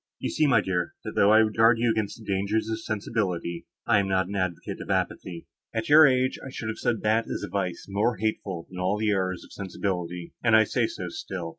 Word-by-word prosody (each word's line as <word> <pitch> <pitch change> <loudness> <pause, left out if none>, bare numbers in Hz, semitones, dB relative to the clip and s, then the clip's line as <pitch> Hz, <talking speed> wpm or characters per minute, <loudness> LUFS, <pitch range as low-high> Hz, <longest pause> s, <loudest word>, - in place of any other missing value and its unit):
You - - -3
see, 155 - +2
my 130 - +4
dear, 90 -2 -2
that, - - -5
though 100 - +4
I 110 +1 +7
would 110 -1 -2
guard 115 +1 +5
you 115 0 +2
against 110 -2 -2
the 110 - -13
dangers 100 +3 0
of 110 0 -2
sensibility, 100 -6 -3 0.2
I 110 -3 +4
am 100 - 0
not 95 -1 +1
an 100 - -6
advocate 95 -3 -3
for - - -5
apathy. 85 -2 -2 0.3
At 115 +3 -2
your 155 +1 +9
age 130 0 +1
I 135 - -7
should 115 -4 -5
have 110 - -5
said 115 -3 -1
that 110 +2 +2
is - - -4
a - - -4
vice 95 -4 -3
more 105 +3 0
hateful 95 -5 -3
than 90 - -9
all 95 +3 +1
the 110 0 +1
errors 95 -2 -1
of - - -15
sensibility, 90 -3 -4
and 115 -2 +5
I 110 - +7
say - - 0
so - - -6
still. 90 -3 -5
100 Hz, 240 wpm, -26 LUFS, 95-110 Hz, 0.3 s, your